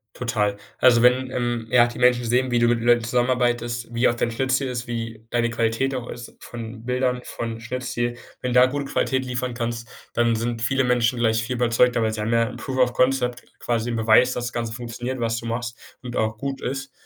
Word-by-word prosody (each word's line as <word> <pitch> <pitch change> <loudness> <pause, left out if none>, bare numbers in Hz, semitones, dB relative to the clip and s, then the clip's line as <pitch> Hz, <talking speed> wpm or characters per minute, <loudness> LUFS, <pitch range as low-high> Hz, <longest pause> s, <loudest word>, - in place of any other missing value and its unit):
Total. 105 -5 -1 0.2
Also, 120 -2 +5
wenn, 130 +1 +4
ähm, 120 -2 -2
ja, 120 0 +6
die 120 - -8
Menschen 125 -1 +4
sehen, 125 +2 +1
wie 120 - +1
du 120 - +4
mit 115 -1 +2
Leuten 120 0 +4
zusammenarbeitest, 120 -1 0
wie 120 +2 +3
auch 120 - +1
dein 120 0 -1
Schnitt-Ziel 130 +3 0
ist, 125 -1 -4
wie 115 -1 -5
deine 120 0 +1
Qualität 115 +4 0
auch 125 -2 -4
ist 120 -1 -9
von 115 -1 -8
Bildern 125 0 0
von 115 -1 -5
Schnitt-Ziel. 120 0 -3 0.2
Wenn 125 - -2
du 125 - +6
da 125 - +8
gute 140 +2 -2
Qualität 130 -1 0
liefern 125 0 -3
kannst, 115 0 -4 0.3
dann 115 -1 +2
sind 115 0 -2
viele 135 +2 +2
Menschen 125 -1 +2
gleich 115 -1 +2
viel 125 +2 -3
überzeugter, 120 0 +3
weil 110 -1 +1
sie 110 - -3
haben 110 +2 -1
ja 115 0 +4
'n - - -8
Proof 130 -1 -5
of 125 -1 +3
Concept, 125 -1 +1 0.2
quasi 120 0 -1
'nen 115 - -2
Beweis, 115 +3 +5
dass 120 - -3
das 120 - -5
Ganze 115 -1 -3
funktioniert, 120 +2 -5
was 115 -1 0
du 115 - -10
machst, 115 0 -3 0.2
und 125 -1 -7
auch 110 0 0
gut 140 +1 -4
ist. 135 +1 -4
120 Hz, 220 wpm, -23 LUFS, 115-125 Hz, 0.3 s, da